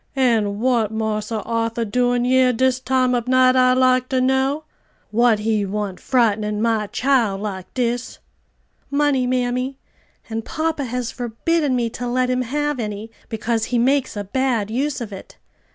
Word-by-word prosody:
"An' 225 -6 +1
what 235 -3 +2
Marse 220 -1 -2
Arthur 230 +1 -1
doin' 245 +2 +1
yer 255 0 +4
dis 255 +2 +1
time 255 -1 +1
ob 240 -1 -1
night, 255 0 +4
I 255 0 +5
like 255 0 +3
ter 260 - +1
know? 265 +3 +1 0.5
what 235 0 +4
he 210 0 0
want 200 -1 -3
frightenin' 215 -4 +1
my 220 -2 +1
chile 240 -5 +1
like 190 -3 -6
dis?" 245 0 -2 0.7
"Money, 280 -3 +1
mammy, 250 +1 -1 0.5
and 225 0 -4
papa 315 0 -2
has 250 0 -3
forbidden 260 +5 -1
me 240 -2 +1
to 245 +1 -5
let 250 +1 +1
him 255 0 +1
have 295 +3 -2
any, 215 0 -5 0.2
because 225 0 -1
he 245 - -1
makes 260 0 +1
a 205 - -2
bad 230 -1 -1
use 265 +3 -1
of 215 -3 -6
it." 190 - -11
245 Hz, 160 wpm, -21 LUFS, 220-260 Hz, 0.7 s, I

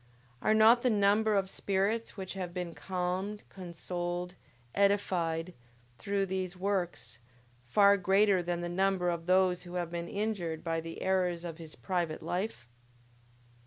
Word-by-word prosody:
Are 215 - +3
not 225 +2 +7
the 250 - +3
number 210 0 +3
of 195 -1 +2
spirits 200 +4 -1
which 190 -1 -5
have 180 -2 -5
been 175 -2 -3
calmed, 185 +4 -3
consoled, 175 0 -4 0.4
edified, 180 -4 +1 0.5
through 200 +6 0
these 185 -1 -3
works, 175 - -2 0.5
far 200 +8 +5
greater 195 0 +3
than 175 0 -2
the 175 - -3
number 185 0 +1
of 170 0 -5
those 185 -1 +3
who 175 0 -9
have 175 -2 -2
been 170 0 -4
injured 195 -6 -2
by 165 -1 -1
the 165 0 -7
errors 180 -2 +1
of 165 -1 -6
his 160 -2 -10
private 175 -4 -2
life? 180 - -3
185 Hz, 145 wpm, -31 LUFS, 175-200 Hz, 0.5 s, not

